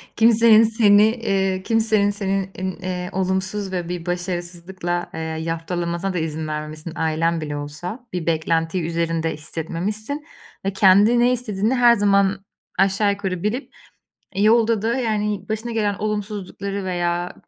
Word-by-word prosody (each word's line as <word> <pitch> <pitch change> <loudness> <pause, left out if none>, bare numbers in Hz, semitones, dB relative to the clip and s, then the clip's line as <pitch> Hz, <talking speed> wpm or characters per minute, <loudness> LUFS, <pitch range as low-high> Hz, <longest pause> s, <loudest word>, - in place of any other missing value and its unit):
kimsenin 225 -1 +6
seni 215 -2 +5
eee, 195 -5 0
kimsenin 220 -2 +2
seni 195 -1 -2
in 185 0 -3
eee, 180 -1 -3
olumsuz 190 +1 -2
ve 175 -2 -3
bir 175 -1 -4
başarısızlıkla, 175 0 -3
eee, - - -5
yaftalamasına 165 +3 -3
da 180 - -1
izin 160 -1 -3
vermemişsin, 155 +1 -5
ailen 160 +1 0
bile 145 -1 -4
olsa. 175 - -7
Bir 180 -3 -3
beklentiyi 165 +1 0
üzerinde 165 -1 -1
hissetmemişsin 205 - -4 0.4
ve 195 - 0
kendi 200 +5 +5
ne 245 +1 +4
istediğini 225 -1 -1
her 240 -1 +6
zaman 200 -2 +2 0.3
aşağı 195 +2 +3
yukarı 190 -3 -3
bilip, 235 +7 -3 0.6
eee, 195 - 0
yolda 225 0 +4
da, 230 +1 +1
yani, 210 -5 -1
başına 220 +2 -3
gelen 210 -3 0
olumsuzlukları 200 -1 -4
veya 175 -1 -1
190 Hz, 135 wpm, -22 LUFS, 170-210 Hz, 0.6 s, kimsenin